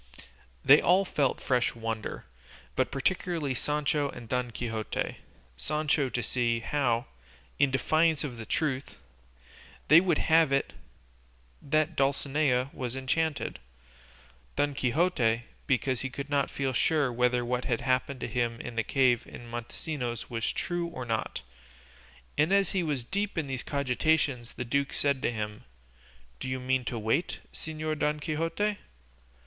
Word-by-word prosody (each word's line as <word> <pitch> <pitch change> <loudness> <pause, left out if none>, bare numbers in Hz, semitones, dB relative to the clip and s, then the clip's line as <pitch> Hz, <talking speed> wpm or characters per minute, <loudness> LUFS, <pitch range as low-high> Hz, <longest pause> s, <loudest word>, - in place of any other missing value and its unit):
They 140 +2 +8
all 185 +3 +4
felt 145 -7 +1
fresh 125 -2 +1
wonder, 115 -1 -4 0.5
but - - +2
particularly 160 0 0
Sancho 150 +2 0
and 120 - -9
Don 125 +1 -1
Quixote; 110 -1 -3 0.4
Sancho 150 - +1
to 120 -1 -2
see 115 -2 0
how, 120 -3 +1 0.5
in 140 -1 +5
defiance 155 +4 +2
of 135 -5 -4
the 115 -2 -8
truth, 140 -4 -1 0.9
they 155 +3 +9
would 175 -4 +2
have 160 -2 +4
it 140 0 +1 0.9
that 155 +3 +1
Dulcinea 135 -1 +1
was 125 -1 -4
enchanted; 145 +4 -1 1.0
Don 145 0 +1
Quixote 125 -4 +2 0.2
because 130 -2 +1
he 130 - -2
could 140 +2 -6
not 140 -1 +2
feel 135 -1 -2
sure 145 0 +2
whether 125 0 +2
what 125 +1 -1
had 115 - 0
happened 130 0 0
to - - -2
him 120 -1 -1
in 120 - -6
the 115 - +1
cave 125 -3 +2
of - - -9
Montesinos 120 +1 -5
was 115 -1 -1
true 175 -1 -2
or 150 -7 -6
not; 110 - -2 1.0
and 155 +5 +4
as 200 -1 +4
he 190 - +1
was 145 -7 -1
deep 200 - -2
in 160 - +1
these 130 -3 -3
cogitations 140 -2 0
the 125 - -4
duke 140 +3 0
said 140 -2 +1
to 125 - +1
him, 105 -2 -4 0.8
"Do - - -4
you 130 0 -2
mean 130 0 0
to 120 - -2
wait, 115 +10 0 0.2
Señor 155 -1 -4
Don 150 0 +1
Quixote?" 165 +7 -1
135 Hz, 145 wpm, -29 LUFS, 120-155 Hz, 1.0 s, they